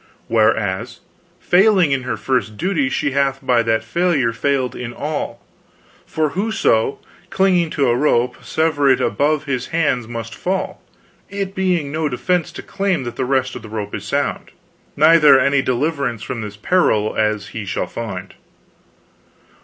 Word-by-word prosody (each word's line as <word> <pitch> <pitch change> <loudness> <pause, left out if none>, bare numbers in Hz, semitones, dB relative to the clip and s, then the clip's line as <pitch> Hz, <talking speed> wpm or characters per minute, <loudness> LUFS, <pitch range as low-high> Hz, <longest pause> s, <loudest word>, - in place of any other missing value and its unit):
Whereas, 110 -4 0 0.4
failing 185 -3 +4
in 135 -1 +1
her 125 - -3
first 125 -5 -1
duty, 165 -7 0
she 140 - -1
hath 135 0 +1
by 125 -2 +3
that 115 -1 0
failure 145 -2 +1
failed 130 +1 -1
in 120 -1 -6
all; 150 0 -4 0.7
for 155 -1 0
whoso, 185 - +1 0.3
clinging 180 -3 +2
to 140 - 0
a 120 - +3
rope, 125 -2 +1
severeth 145 -4 +2
it - - -1
above 150 +1 +1
his 130 -4 -3
hands, 145 -8 0
must 115 -1 -6
fall; 185 - -3 0.5
it 195 -1 -4
being 180 -7 0
no 155 0 -1
defense 175 +6 -1
to - - -8
claim 195 -7 -1
that 120 -1 -6
the 130 - -2
rest 130 0 0
of - - -7
the 110 - -11
rope 105 -2 -5
is - - -5
sound, - - -2 0.5
neither 155 -2 +6
any 140 +1 +3
deliverance 130 -3 -1
from 115 - -5
his 105 -1 -7
peril, 110 - +1
as 105 -2 0
he 110 - -6
shall 95 - -2
find. 100 -5 -6
135 Hz, 155 wpm, -19 LUFS, 115-165 Hz, 0.7 s, neither